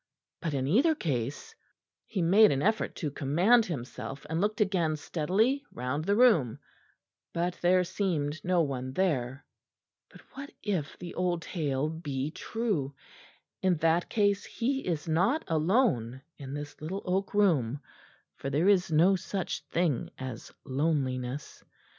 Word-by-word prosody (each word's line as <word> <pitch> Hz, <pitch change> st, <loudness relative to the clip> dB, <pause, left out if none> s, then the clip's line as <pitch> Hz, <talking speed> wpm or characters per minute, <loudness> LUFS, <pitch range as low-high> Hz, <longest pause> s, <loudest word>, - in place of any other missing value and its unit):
But 160 Hz, -5 st, -2 dB
in 130 Hz, -1 st, 0 dB
either 265 Hz, -, +4 dB
case 145 Hz, -, -3 dB, 0.5 s
He 190 Hz, -5 st, -1 dB
made 205 Hz, +6 st, +6 dB
an 135 Hz, 0 st, 0 dB
effort 220 Hz, +2 st, +1 dB
to 150 Hz, -4 st, -3 dB
command 175 Hz, -, +3 dB
himself, 135 Hz, -2 st, -6 dB
and 160 Hz, +3 st, -1 dB
looked 210 Hz, +1 st, 0 dB
again 180 Hz, -7 st, +1 dB
steadily 195 Hz, -, 0 dB
round 130 Hz, +5 st, -3 dB
the 200 Hz, -, +2 dB
room; 205 Hz, -, +4 dB, 0.8 s
but 175 Hz, +1 st, 0 dB
there 180 Hz, +1 st, +4 dB
seemed 160 Hz, -6 st, -2 dB
no 180 Hz, -1 st, +2 dB
one 130 Hz, -3 st, -4 dB
there. 135 Hz, -7 st, -1 dB, 0.6 s
But -, -, -15 dB
what 280 Hz, +1 st, -7 dB
if 185 Hz, -8 st, -2 dB
the 175 Hz, -, -8 dB
old 175 Hz, -2 st, -1 dB
tale 145 Hz, -4 st, -1 dB
be 150 Hz, -3 st, -3 dB
true? 185 Hz, -, -2 dB, 0.7 s
In 185 Hz, -1 st, +3 dB
that 165 Hz, +2 st, +2 dB
case 205 Hz, -2 st, +2 dB
he 265 Hz, +1 st, -2 dB
is 165 Hz, -2 st, -2 dB
not 190 Hz, -, +2 dB
alone 155 Hz, -, +1 dB, 0.2 s
in 140 Hz, 0 st, -6 dB
this 145 Hz, 0 st, -7 dB
little 185 Hz, +6 st, -4 dB
oak 190 Hz, +2 st, -1 dB
room, 145 Hz, -, +2 dB, 0.6 s
for 135 Hz, -, -4 dB
there 150 Hz, +7 st, +1 dB
is 190 Hz, -4 st, +3 dB
no 170 Hz, +5 st, +5 dB
such 190 Hz, 0 st, -3 dB
thing 165 Hz, -7 st, 0 dB
as 130 Hz, -3 st, -7 dB
loneliness. 135 Hz, -2 st, -2 dB
165 Hz, 140 wpm, -29 LUFS, 140-195 Hz, 0.8 s, made